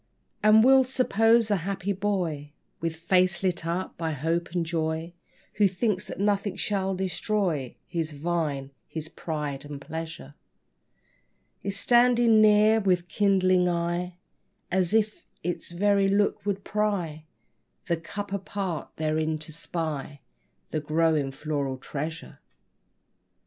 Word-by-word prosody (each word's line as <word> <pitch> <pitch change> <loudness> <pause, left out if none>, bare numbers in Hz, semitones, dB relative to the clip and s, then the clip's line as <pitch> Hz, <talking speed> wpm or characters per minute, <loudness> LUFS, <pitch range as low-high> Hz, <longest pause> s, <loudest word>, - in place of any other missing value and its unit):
And 215 +1 +7
we'll 265 +1 +7
suppose 230 -3 +3
a 205 - +4
happy 195 +2 -2
boy, 175 -7 -2 0.3
With 165 -1 -2
face 180 +2 +2
lit 175 -3 0
up 175 +1 -3
by 160 -2 -1
hope 165 +4 -1
and 175 -1 -1
joy, 160 0 -2 0.4
Who 205 - +5
thinks 190 0 -1
that - - -7
nothing 200 -1 +1
shall 195 -1 -1
destroy 185 - -1
His 165 -3 -2
vine, 145 -3 -2 0.2
his 160 -1 -5
pride 150 -5 -4
and 145 -1 -7
pleasure, 160 - -7 1.3
Is 200 0 -2
standing 240 -1 +5
near, 215 +1 +6
with 180 -4 +1
kindling 185 -3 +3
eye, 175 +1 -1 0.6
As 185 +2 +2
if 215 -1 0 0.2
its 175 +1 -3
very 200 +3 +2
look 205 +1 +1
would 200 -1 -1
pry 190 -8 -1 0.6
The 170 - 0
cup 200 +4 -6
apart, 195 -4 -3
therein 155 0 0
to 155 +1 -8
spy 150 -3 -4 0.5
The - - 0
growing 155 -2 +1
floral 140 -1 -3
treasure. 155 +4 -6
175 Hz, 125 wpm, -27 LUFS, 160-200 Hz, 1.3 s, And